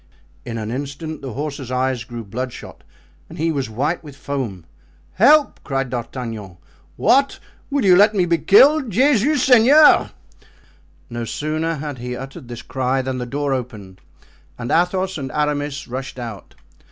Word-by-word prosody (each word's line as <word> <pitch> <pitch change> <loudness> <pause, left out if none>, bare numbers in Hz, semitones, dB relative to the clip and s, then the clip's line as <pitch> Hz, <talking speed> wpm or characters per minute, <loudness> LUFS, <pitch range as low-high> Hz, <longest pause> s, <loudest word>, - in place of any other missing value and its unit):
In 115 -1 -5
an 110 0 -4
instant 145 +4 -5
the 135 -4 -6
horse's 140 -2 -5
eyes 130 -1 -1
grew 120 -1 -8
bloodshot 120 +5 -7 0.5
and - - -11
he 165 +1 0
was 135 -6 -2
white 145 +11 -2
with 145 -3 -11
foam. 125 - -5 0.5
"Help!" 300 - +4
cried 135 -3 -2
D'Artagnan. 115 -6 -6 0.4
"What! 275 - +3 0.3
will 280 -5 0
you 185 -2 +7
let 210 +3 +5
me 185 -3 +2
be 170 -1 +1
killed? 270 - +5
Jesus 265 +4 +3
Seigneur!" 265 +5 +6 1.0
No 120 0 -4
sooner 155 +6 -2
had 145 -3 -6
he 125 +1 -5
uttered 135 0 -9
this 120 -1 -8
cry 130 0 -1
than 130 0 -3
the 125 - -4
door 140 +2 -1
opened 105 -7 -6 0.6
and 120 0 -5
Athos 185 +1 +1
and 135 -2 -5
Aramis 145 -1 -2
rushed 130 +1 -6
out. 115 -5 -8
135 Hz, 155 wpm, -20 LUFS, 125-170 Hz, 1.0 s, you